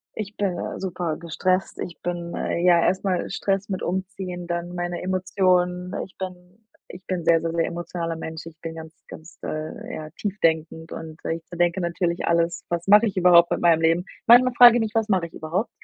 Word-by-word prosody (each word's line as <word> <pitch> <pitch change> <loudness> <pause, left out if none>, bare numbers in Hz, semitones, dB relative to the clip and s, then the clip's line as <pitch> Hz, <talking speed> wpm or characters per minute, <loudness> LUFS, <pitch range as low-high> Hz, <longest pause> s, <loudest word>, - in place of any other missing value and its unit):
ich 210 -1 -6
bin, 195 -3 -1
äh, - - -5
super 175 -4 -3
gestresst 185 +3 -1
ich 170 - -6
bin, 175 -1 -4
äh - - -2
ja 175 -2 +6
erst 190 +1 +1
mal 185 -3 -1
Stress 195 0 -1
mit 190 - -3
Umziehen, 185 -1 -4
dann 175 0 -3
meine 175 0 -3
Emotionen. 180 -1 +1
Ich 190 - -21
bin 180 +1 -8 0.3
ich 180 +1 -12
bin 185 -1 -2
'n - - -10
sehr, 165 -1 +5
sehr, 165 0 -3
sehr 165 0 +1
emotionaler 170 -1 -4
Mensch, 160 0 -7
ich 165 0 -13
bin 165 -1 -5
ganz, 160 -1 -10
ganz, 160 0 -12
äh 155 0 -5
ja, 155 0 -6
tief-denkend 160 -5 -1
und 160 -1 -8
ich 165 0 -4
zerdenke 175 +1 0
natürlich 170 0 -1
alles: 170 0 0
„Was 170 0 -3
mache 210 +3 +7
ich 205 - -2
überhaupt 175 -2 +6
mit - - 0
meinem 165 -2 +4
Leben?“ 165 +2 +2 0.2
Manchmal 245 +2 +7
frage 240 -1 +9
ich 240 - +1
mich: 220 - -2
„Was 225 -1 +2
mache 185 -5 +1
ich 165 - -23
überhaupt 175 +8 -2
175 Hz, 205 wpm, -24 LUFS, 165-190 Hz, 0.3 s, frage